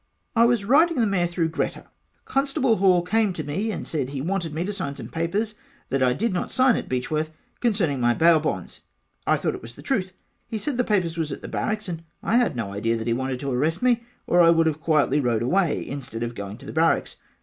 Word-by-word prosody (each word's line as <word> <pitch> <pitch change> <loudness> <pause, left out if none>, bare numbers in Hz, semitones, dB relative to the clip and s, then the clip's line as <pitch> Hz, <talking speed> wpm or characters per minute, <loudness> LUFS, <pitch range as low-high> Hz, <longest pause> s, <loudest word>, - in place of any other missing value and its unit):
I 230 0 +6
was 235 -4 +2
riding 305 +6 +4
the 230 - +4
mare 190 -4 +1
through 170 -1 -1
Greta 160 - -3 0.4
Constable 270 -4 +1
Hall 185 -2 +4
came 210 +2 +1
to 160 - -4
me 180 +10 -2
and 210 - -4
said 145 -5 -2
he 140 -1 -4
wanted 170 +2 -2
me 160 +4 -2
to 205 - -3
sign 140 -7 -4
some - - -8
papers 195 +7 -1 0.4
that 135 0 0
I 130 -1 +4
did 215 - -1
not 180 - -2
sign 255 -2 +4
at - - -4
Beechworth 150 +5 -1 0.3
concerning 185 - +1
my 120 0 +3
bail 165 -1 +5
bonds 95 - -4 0.5
I - - +4
thought - - -1
it - - -7
was 115 +1 -11
the - - -13
truth 190 -8 -1 0.3
he 225 - -3
said 250 +4 -3
the - - +4
papers 180 -7 0
was 155 -3 -1
at - - -6
the - - -5
Barracks 215 -1 -2
and 165 -2 -4 0.2
I 235 - +2
had 240 - +2
no 105 -5 -3
idea 115 +3 0
he 115 +1 -1
wanted 130 +1 -2
to 140 -1 -2
arrest 155 - 0
me 245 -2 +3 0.2
or 175 - +4
I 165 - +7
would 165 -1 +4
have 155 -1 0
quietly 150 -3 +2
rode 120 -4 +1
away 175 +6 +1
instead 125 -5 -5
of 120 0 -3
going 100 -1 -7
to - - -13
the - - -7
Barracks. - - +1
170 Hz, 240 wpm, -24 LUFS, 135-210 Hz, 0.5 s, I